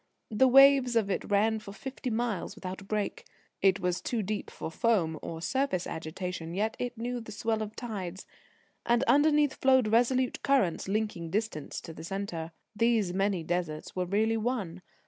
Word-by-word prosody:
The 220 +5 +4
waves 270 -1 +7
of 210 -3 +2
it - - -2
ran 215 +2 +2
for 205 -2 -10
fifty 265 +3 -5
miles 225 -4 -2
without 190 -2 -6
a - - -10
break. 210 - -2 0.4
It 195 0 +4
was 180 -1 -1
too 230 -3 -2
deep 205 +2 -3
for - - -6
foam 170 -7 +1
or 165 0 -6
surface 260 -7 0
agitation, 170 +1 -5
yet 215 +3 0
it 245 -1 -3
knew 240 +1 -3
the 220 - -10
swell 220 +1 -1
of 215 0 -5
tides. 195 -6 -5 0.6
And 240 +1 +2
underneath 295 0 +4
flowed 260 -4 +3
resolute 245 +3 +2
currents, 260 - +1
linking 200 -5 -2
distance 200 -6 -3
to 165 - -9
the 160 - -10
centre. 175 -3 -4 0.2
These 220 -4 +2
many 195 -2 0
deserts 165 -2 -3
were 180 -1 0
really 220 +4 +1
one. 215 -7 -2
215 Hz, 170 wpm, -29 LUFS, 185-240 Hz, 0.6 s, waves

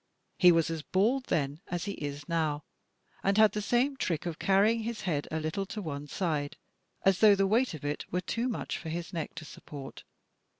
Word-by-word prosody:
He 180 -1 +8
was 165 -1 +2
as 160 -1 -3
bald 225 - +1
then 145 - -1
as 175 +1 -3
he 200 - -2
is 145 -4 -5
now, 155 -3 0 0.6
and 195 +1 +2
had 215 -1 +7
the 210 - -2
same 245 +6 +2
trick 170 - -2
of 170 -1 -4
carrying 205 +4 +4
his 225 -1 -4
head 160 -8 -1
a 160 - -2
little 160 +5 -2
to 210 - -5
one 145 -6 -5
side, 150 -4 -2 0.5
as 195 -1 +4
though 210 -2 +7
the 195 0 +2
weight 225 0 +2
of 145 - -9
it 145 0 -3
were 180 - 0
too 235 +6 -1
much 235 - -3
for 160 - -6
his 170 +3 -4
neck 165 -1 -4
to 160 -1 -7
support. 140 -2 -9
175 Hz, 210 wpm, -30 LUFS, 155-210 Hz, 0.6 s, He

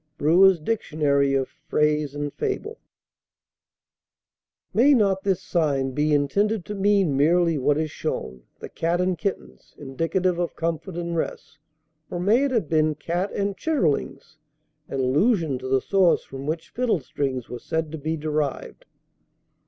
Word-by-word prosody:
BREWER'S 180 +4 +5
Dictionary 150 -7 +1
of 135 -1 0
Phrase 150 -1 -1
and 145 -1 -4
Fable. 435 +1 -4 1.9
May 275 +6 +5
not 195 -5 +2
this 190 -3 -1
sign 140 -5 0
be 150 +3 0
intended 195 +8 +1
to 210 - -5
mean 195 -6 +2
merely 165 +2 +3
what 145 +3 +2
is 155 -1 -2
shown, 65 -1 -4 0.2
"The - - -7
Cat 170 +2 -1
and 180 0 +1
Kittens," 110 - -6
indicative 165 +6 -1
of 175 - -2
comfort 165 +2 -3
and 170 -1 -3
rest? 155 -1 -4 0.5
Or 175 - -4
may 215 +9 +3
it - - 0
have 230 - 0
been 155 0 +2
"Cat 175 +6 -2
and 200 0 -1
Chitterlings," 155 - -1 0.5
in 135 - -2
allusion 150 - +2
to 130 - -6
the 130 0 +2
source 190 -3 +3
from 135 +1 -8
which 160 +1 -4
fiddlestrings 140 - -1
were 125 - -7
said 160 -2 -3
to 160 - -6
be 160 +3 -2
derived? 150 -2 -3
160 Hz, 145 wpm, -24 LUFS, 145-190 Hz, 1.9 s, BREWER'S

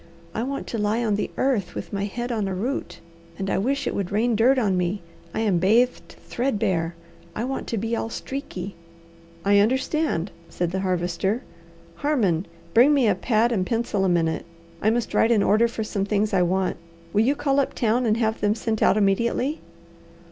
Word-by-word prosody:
I 220 - -2
want 275 +3 -3
to 230 - -4
lie 215 +3 +1
on 215 - +1
the 205 - -1
earth, 250 -9 0
with - - -6
my 200 0 -1
head 240 +4 -4
on 215 -4 -1
a 190 - -2
root; 245 +10 -3 0.4
and 195 0 -2
I - - +1
wish 275 +7 0
it - - -1
would 195 -3 -3
rain 225 +3 +2
dirt 250 +5 +4
on 205 -7 +2
me. 180 +1 -1 0.3
I 220 - -2
am 200 -6 +2
bathed 230 +7 +2
threadbare. 200 -9 0 0.4
I 220 - -2
want 265 +2 -3
to 230 - -2
be 225 +3 -1
all 225 - -2
streaky." 205 -8 -5 0.7
"I 200 0 +5
understand," 260 - +1 0.2
said 175 -1 -2
the 190 - -1
Harvester. 185 +4 -1 0.5
"Harmon, 205 - +1 0.3
bring 260 +6 +6
me 265 -5 +3
a 205 - +4
pad 225 +4 +1
and 200 -6 +1
pencil 225 -1 -1
a 190 - +2
minute, 165 -1 0 0.3
I 215 - +3
must 235 0 -1
write 225 - +4
an 215 -4 +4
order 220 +3 +4
for 230 -1 -4
some 200 -2 -2
things 210 +1 0
I 185 - +4
want. 185 +1 +1 0.4
Will 210 - +4
you 265 +6 +3
call 280 -1 +1
up 275 - 0
town 235 +1 +1
and 215 0 +2
have 220 -1 0
them 205 +1 +2
sent 220 -1 -2
out - - +4
immediately?" 235 +8 +1
215 Hz, 200 wpm, -24 LUFS, 195-240 Hz, 0.7 s, bring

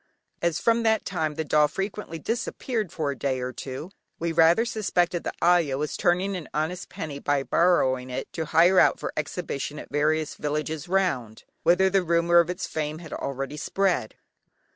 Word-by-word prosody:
As 170 -1 +1
from 230 0 +2
that 220 -1 +2
time 160 -5 -2
the 160 - -2
doll 150 0 +4
frequently 195 +1 -4
disappeared 225 - -3
for 155 -5 -2
a - - -5
day 130 0 -1
or 125 0 -4
two, 135 +9 -7 0.3
we 170 0 -2
rather 165 +7 +5
suspected 180 -6 0
the - - -2
ayah 170 -6 +3
was 150 +1 -2
turning 185 +3 +1
an 175 -4 -6
honest 160 +4 -2
penny, 155 -7 -6
by 145 -1 0
borrowing 130 -7 +2
it 130 +1 -5
to 160 - -3
hire 175 +4 +5
out - - +4
for - - -4
exhibition 155 -2 -4
at - - -9
various 155 +1 +1
villages 150 +1 -3
round, 170 - -1 0.2
whither 185 +2 +4
the 190 0 +3
rumour 170 0 +4
of 170 0 +2
its 180 +1 -3
fame 155 0 -3
had 165 -1 -9
already 135 +1 -4
spread. 185 - 0
165 Hz, 180 wpm, -26 LUFS, 145-180 Hz, 0.3 s, rather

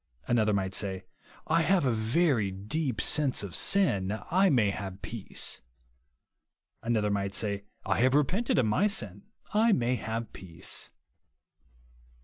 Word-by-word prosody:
Another 110 -3 +2
might 95 -2 -1
say, 95 -1 -2 0.4
I 165 +1 +2
have 180 -1 +2
a 130 - +3
very 115 - +1
deep 110 +6 -3
sense 140 -1 +1
of 95 -4 -6
sin, 105 - +1
I 190 +2 +4
may 115 - +3
have 95 -1 -7
peace. 115 -4 -2 1.2
Another 110 -3 0
might 100 0 -1
say, 100 -2 -1 0.2
I 95 - 0
have 130 +3 +3
repented 180 - +1
of 130 - +3
my 110 - +2
sin, 105 - -2 0.3
I 220 +1 +4
may 125 -4 +1
have 110 +1 -4
peace. 85 -3 -5
110 Hz, 135 wpm, -29 LUFS, 100-150 Hz, 1.2 s, I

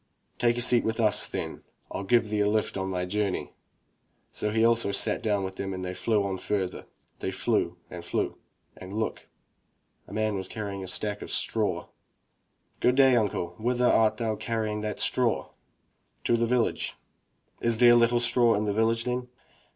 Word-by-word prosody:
"Take 120 0 +2
a - - 0
seat 120 -1 +6
with 110 +1 -2
us, 110 -2 +3
then. - - -5 0.3
FU - - -3
give 110 +1 +2
thee 105 - 0
a 105 0 +3
lift 110 0 0
on 95 -1 -2
thy 90 -1 -2
journey." 100 0 -2 0.8
So 105 - -1
he 110 +1 +2
also 115 -3 +3
sat 100 - +2
down 105 -4 0
with 95 0 -5
them 95 -1 -4
and 95 0 -5
they 90 - -4
flew 105 +1 +1
on 95 -1 -3
further. 95 -3 -3 0.3
They - - -2
flew - - -1
and - - -9
flew - - -2 0.4
and 95 +1 -10
look! 110 +1 -3 0.4
— - - -44
a - - -13
man 110 0 0
was 95 -2 -3
carrying 100 -3 -5
a - - -7
sack 105 +3 -2
of - - -7
straw. - - -1 0.9
"Good 125 - +3
day, 135 -1 +6
imcle, 100 -7 0
whither 125 +2 +1
art 110 -2 +3
thou 110 -1 -1
carrying 110 -1 -2
that 105 0 -4
straw?" - - +1 0.7
"To 120 - +2
the 115 0 +1
village." 120 -1 0 0.6
"Is 115 -1 +2
there 120 0 +7
little 120 0 +4
straw 120 -1 +4
in 105 +1 -1
the 105 - 0
village, 115 +2 +1
then?" 125 0 -3
110 Hz, 185 wpm, -27 LUFS, 100-115 Hz, 0.9 s, there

